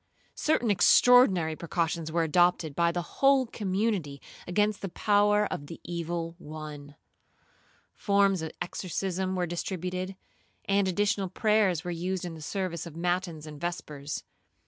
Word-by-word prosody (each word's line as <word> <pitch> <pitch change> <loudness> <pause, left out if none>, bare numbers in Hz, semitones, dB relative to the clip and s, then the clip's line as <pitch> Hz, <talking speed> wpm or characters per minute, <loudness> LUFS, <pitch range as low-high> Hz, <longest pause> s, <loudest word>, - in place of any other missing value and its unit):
Certain 245 -8 +1
extraordinary 195 -6 +5
precautions 165 -1 -2
were 165 +1 +1
adopted 165 -2 +2
by 170 0 +3
the 175 0 -2 0.2
whole 275 -1 +5
community 195 -9 -2 0.3
against 205 +3 +1
the 195 - -4
power 210 +2 +3
of 145 - -6
the 165 - -9
evil 170 -1 -4
one. 150 -2 -9 1.0
Forms 200 -3 +2
of 160 - -3
exorcism 185 +1 -3
were 180 -1 0
distributed, 185 +2 -4 0.5
and 200 0 +2
additional 200 0 0
prayers 205 -4 +2
were 175 - -3
used 180 +2 -3
in 175 - -5
the 160 - -10
service 175 -1 -3
of 160 - -11
matins 175 -2 -2
and 150 -1 -10
vespers. 150 -4 -4
180 Hz, 135 wpm, -28 LUFS, 165-200 Hz, 1.0 s, extraordinary